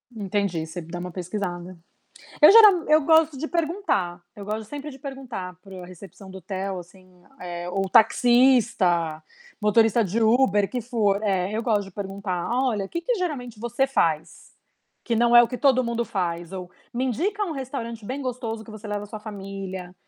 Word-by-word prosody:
Entendi, 200 -5 -2
você 165 +2 -7
dá 170 +2 -7
uma 180 +1 -6
pesquisada. 180 -1 -5 0.6
Eu 300 - +9
gera 445 -1 +10 0.2
eu 305 0 +5
gosto 320 0 +4
de 315 +4 -4
perguntar, 320 - -1
eu 205 - -8
gosto 215 +2 -3
sempre 290 +2 -7
de 265 - -12
perguntar 255 -10 -7
para 195 -1 -13
o 185 - -8
a - - -9
recepção 190 +1 -13
do 190 - -9
hotel, 190 +1 -4
assim, 180 0 -15 0.2
eh, 175 -1 -6
ou 195 +1 -1
taxista, 225 -8 +3 0.4
motorista 225 +2 +3
de 205 +4 -1
Uber 220 -3 +3
que 250 - -2
for, 215 -4 0
é, 190 -2 0
eu 220 +2 -2
gosto 210 -4 +1
de - - -13
perguntar: 195 -2 -4
"Olha, 240 -4 0
o - - -8
que 340 - -4
que 485 +7 0
geralmente 260 - -4
você 240 +4 0
faz, 165 - -1 0.5
que 235 - -1
não 235 +1 +3
é 240 - +10
o 235 - +1
que 250 - -5
todo 265 -3 +4
mundo 235 -1 -2
faz?". 175 -4 -3
Ou: 180 -2 -7 0.2
"Me 250 +2 0
indica 370 - -1
um 370 - -5
restaurante 245 -5 -6
bem 265 +6 -4
gostoso, 235 -3 -4
que 225 - -13
você 215 0 -10
leva 205 0 -4
sua 215 +1 -8
família". 195 -3 -7
210 Hz, 190 wpm, -24 LUFS, 185-250 Hz, 0.6 s, gera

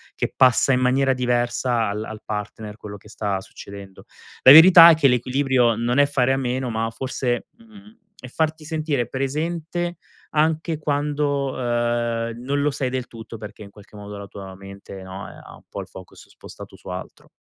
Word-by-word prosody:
che - - -3
passa 130 +1 +4
in 125 - +1
maniera 135 +1 +2
diversa 120 -1 0
al 105 +2 -4
al 110 0 -9
partner 105 0 -6
quello 105 -2 -9
che 105 - -18
sta 100 -2 -3
succedendo. 100 0 -12 0.4
La 130 - +10
verità 170 +2 +10
è - - +4
che 155 -3 +3
l'equilibrio 125 -1 +2
non 120 +3 -1
è 145 - +6
fare 135 -2 +1
a - - 0
meno 130 -1 -2
ma, 115 0 -2
forse, 125 0 -3
mhmm, 220 -1 -17 0.2
è 125 - -10
farti 155 +3 -2
sentire 155 -6 -2
presente 165 +6 -3 0.4
anche 160 +1 0
quando, 145 -2 -1
ehm, 120 -1 -1
non 140 +2 -1
lo 145 - +2
sei 135 -2 -2
del 130 -1 -3
tutto 115 0 -10
perché, 105 0 -10
in 100 - -12
qualche 105 +1 -17
modo, 105 0 -9
la 100 0 -9
tua 95 -1 -10
mente, 100 0 -11
no, 95 +1 -8
eh, - - -13
ha - - -13
un - - -19
po' - - -7
il - - -10
focus - - -14
spostato - - -13
su - - -17
altro. 90 0 -8
125 Hz, 185 wpm, -22 LUFS, 110-145 Hz, 0.4 s, La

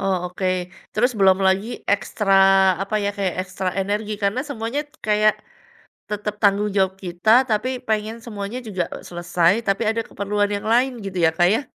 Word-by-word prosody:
Oh, 195 -1 +1 0.2
oke. 185 +1 -3 0.5
Terus 245 +4 +2
belum 190 -1 +5
lagi 190 +2 +2 0.2
ekstra 205 0 0 0.5
apa 200 +2 -5
ya, - - +1
kayak 195 -3 -1
ekstra 185 0 -4
energi 205 +2 -2
karena 200 +5 +1
semuanya 235 +1 -3 0.3
kayak 215 0 +3 0.8
tetep 210 0 -3
tanggung 205 0 +3
jawab 190 -1 +2
kita, 175 +4 -1 0.2
tapi 215 +3 +1 0.2
pengen 220 +1 -1
semuanya 210 +1 -5
juga 190 -4 -2 0.3
selesai, 175 0 +1 0.2
tapi 195 +3 +1
ada 230 +1 -1
keperluan 205 +1 -1
yang 205 0 -3
lain, 255 +3 +3
gitu 190 -2 -5
ya, - - +4
Kak, 175 - +4
ya? 230 - +1
205 Hz, 165 wpm, -22 LUFS, 190-215 Hz, 0.8 s, belum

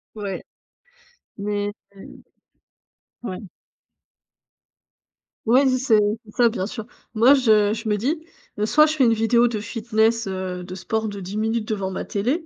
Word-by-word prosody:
Ouais 200 -3 -5 0.9
mais 205 0 -2 0.2
mmh. 195 - -13 1.0
Ouais. 185 -6 -5 2.1
Ouais, 255 +5 +4
c'est 255 -3 +3 0.3
ça, 240 0 +3
bien 200 -4 -3
sûr. 220 -2 -7 0.3
Moi, 240 +6 +6
je 215 -6 +4
je 225 0 -5
me 210 - +2
dis, 310 - -2 0.3
heu: 210 - 0
«Soit 305 +7 +5
je 310 - 0
fais 260 - +4
une 230 - +4
vidéo 235 +2 +3
de 220 -3 -3
fitness, 225 -1 0
heu, 185 -1 -4
de 185 0 -8
sport 220 +4 -2
de 200 -1 -6
10 190 +3 -6
minutes 220 0 -1
devant 195 -3 -2
ma - - -4
télé, 260 - -1
220 Hz, 150 wpm, -22 LUFS, 205-240 Hz, 2.1 s, Moi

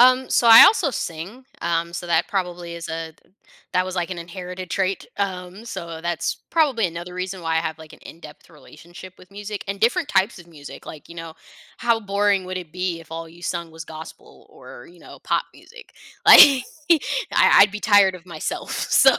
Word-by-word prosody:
Um, 255 +1 +5
so, 235 - +3
I 225 0 +11
also 385 -8 +3
sing, 195 +4 -6 0.2
um, 170 0 -1
so 175 - -6
that 165 -1 +2
probably 180 -5 -4
is 170 0 -8
a 160 0 -5
th - - -32 0.4
that 185 0 +2
was 185 - -5
like 175 +1 -2
an 180 - -5
inherited 180 +1 -8
trait. 195 -1 -2
Um, 190 +1 -4
so 170 -7 -7
that's 170 -1 -2
probably 275 - +2
another 175 +1 -8
reason 185 +1 -5
why 165 0 -1
I 160 - +2
have, 160 -1 -5
like, 160 -1 -13
an - - -16
in-depth 160 -1 -14
relationship 170 +4 -14
with 180 - -18
music, 205 +1 -7
and 195 0 -4
different 235 +2 +1
types 195 +3 +1
of 170 - -17
music. 150 -3 -12
Like, 155 - -11
you 170 - -12
know, 165 -1 -9 0.4
how 235 -1 +1
boring 200 -1 0
would 185 0 -5
it 165 -4 -10
be 180 -2 -3
if 165 0 -15
all 165 0 -6
you 170 +2 -17
sung 170 -1 -4
was 160 0 -10
gospel 160 0 -12
or, 120 - -14
you 175 - -19
know, - - -14
pop - - 0
music? 475 0 -16 0.3
Like - - +11 0.9
I - - +5
I'd 205 - +7
be 210 +1 -7
tired 205 -3 +4
of 175 0 -18
myself, 165 -3 -5
so. - - +4
180 Hz, 205 wpm, -22 LUFS, 165-200 Hz, 0.9 s, I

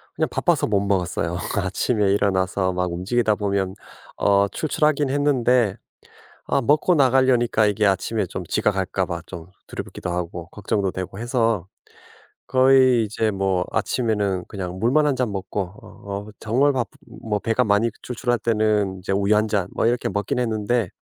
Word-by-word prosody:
그냥 - - 0
바빠서 - - +1
못 100 -2 +2
먹었어요. 90 -3 -1 0.2
아침에 100 +2 +1
일어나서 95 -1 +1
막 90 -1 -1
움직이다 105 +5 0
보면 100 -2 -1 0.4
어 100 0 +3
출출하긴 150 0 0
했는데 125 -7 +2 0.7
아 140 - +1
먹고 150 +7 +3
나가려니까 130 -5 +3
이게 105 +1 +1
아침에 100 +1 +1
좀 90 0 -6
지각 105 +1 +1
할까 95 0 -1
봐 85 -2 -5
좀 85 -1 -9 0.2
두렵기도 - - -6
하고 85 -1 -4
걱정도 100 -1 -2
되고 95 +1 -6
해서 115 -6 0 0.8
거의 130 -2 +5
이제 110 +1 -1
뭐 95 -2 0
아침에는 105 -7 -1
그냥 95 -3 -6
물만 135 +8 +3
1 145 - +2
잔 125 -4 -1
먹고 95 +1 -3 0.2
어 100 +1 -8
정말 130 +7 +2
바쁘 125 -2 -2 0.5
배가 115 +3 +2
많이 105 +2 +2
출출할 120 -1 -2
때는 105 -4 +1
이제 95 - -5
우유 100 +2 +2
1 110 +1 +2
잔 100 -4 0 0.2
이렇게 120 +1 +1
먹긴 100 +4 -2
했는데 115 -2 0
105 Hz, 310 characters per minute, -22 LUFS, 95-120 Hz, 0.8 s, 거의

